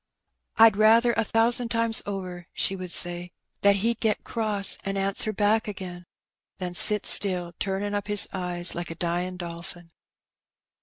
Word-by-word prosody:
"I'd 225 -2 +6
rather 230 +3 +5
a - - +1
thousan' 230 +2 +1
times 230 -1 +1
over," 180 -3 -6
she 195 - -1
would 185 -1 -7
say, 175 +1 -2 0.3
"that 200 0 +5
he*d 230 +4 -1
get 220 -2 0
cross, 210 -4 -1
an' 195 0 -3
answer 195 +2 -1
back 215 +2 +1
again, 180 -3 -7 0.5
than 180 -2 -5
sit 210 +3 +5
still, 180 -3 +2
turnin' 200 +1 -2
up 205 0 -3
his 205 -1 +3
eyes 180 -2 -2
like 175 0 -5
a 165 - -6
dyin' 175 +2 -2
dolphin." 170 0 -7
195 Hz, 155 wpm, -25 LUFS, 175-215 Hz, 0.5 s, I'd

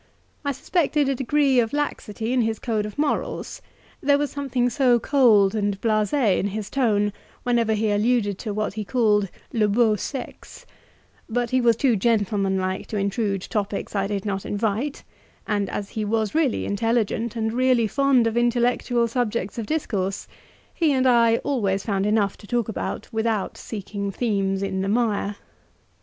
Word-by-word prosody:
I 285 - 0
suspected 295 0 0
a - - +2
degree 270 0 +2
of 225 +1 0
laxity 235 -5 -2
in 255 - +3
his 225 -1 0
code 215 -3 -2
of 210 - -10
morals, 295 0 -2 0.4
there 285 0 +4
was 290 0 -1
something 265 -3 -1
so 245 -2 +3
cold 220 -7 +4
and 205 -2 -1
BLASE 215 -2 +1 0.3
in 200 - 0
his 205 0 -5
tone 210 -6 +1 0.3
whenever 235 -3 +2
he 215 0 0
alluded 205 -2 +1
to 220 - -4
what 215 0 -2
he 215 0 -4
called 210 -3 +2 0.2
"le 215 -2 +2
beau 215 +1 +3
sexe;" 260 +5 -7 0.6
but 240 +1 -1
he 255 0 +3
was 235 -1 +4
too 245 0 +2
gentlemanlike 195 -3 0
to 215 - -4
intrude 200 -1 -1
topics 205 -1 -3
I 195 -1 +1
did 200 -1 -3
not 195 -2 -2
invite, 220 +7 -2 0.4
and 205 -2 -1
as 200 -1 -4
he 215 - -3
was 215 0 0
really 310 -5 +1
intelligent 225 +1 0
and 220 -1 -1
really 250 -1 +3
fond 265 +2 +3
of 225 0 0
intellectual 240 0 +1
subjects 235 -3 -2
of 220 - -4
discourse, 195 -11 -2 0.5
he 325 -4 +2
and 260 -1 +2
I 235 -2 +5
always 200 -9 0
found 200 -2 0
enough 210 -2 +1
to 205 - -14
talk 240 -1 0
about, 220 - -4
without 220 -2 -1
seeking 200 -1 -5
themes 195 -3 -1
in 190 -1 -2
the 195 - -1
mire. 210 -2 0
220 Hz, 165 wpm, -23 LUFS, 205-245 Hz, 0.6 s, I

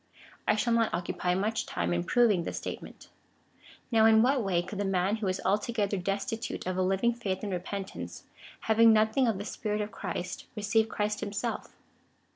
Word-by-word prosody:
I - - +4
shall 235 +2 +1
not 230 -1 +2
occupy 180 0 -1
much 215 +4 -1
time 85 0 -1
in 85 0 0
proving 220 -8 +3
this - - -4
statement. - - -7 0.8
Now 220 -1 +5
in 220 0 +6
what 265 +1 +3
way 180 -3 +1
could 195 +3 -7
the - - +1
man 195 +2 +1
who 215 -3 -2
is 185 0 -1
altogether 210 +1 +1
destitute 200 +4 -3
of 185 0 -2
a 185 - 0
living 195 +6 +2
faith 200 -5 -3
and 205 - -3
repentance, 195 +2 -5 0.4
having 225 0 +5
nothing 220 +4 +3
of 220 -4 +1
the 200 - -5
Spirit 210 -1 -3
of 210 0 -3
Christ,^ 175 0 -5
receive 220 +1 +1
Christ 210 0 -1
him 205 -2 -3
self? 230 +2 -3
210 Hz, 185 wpm, -29 LUFS, 190-225 Hz, 0.8 s, in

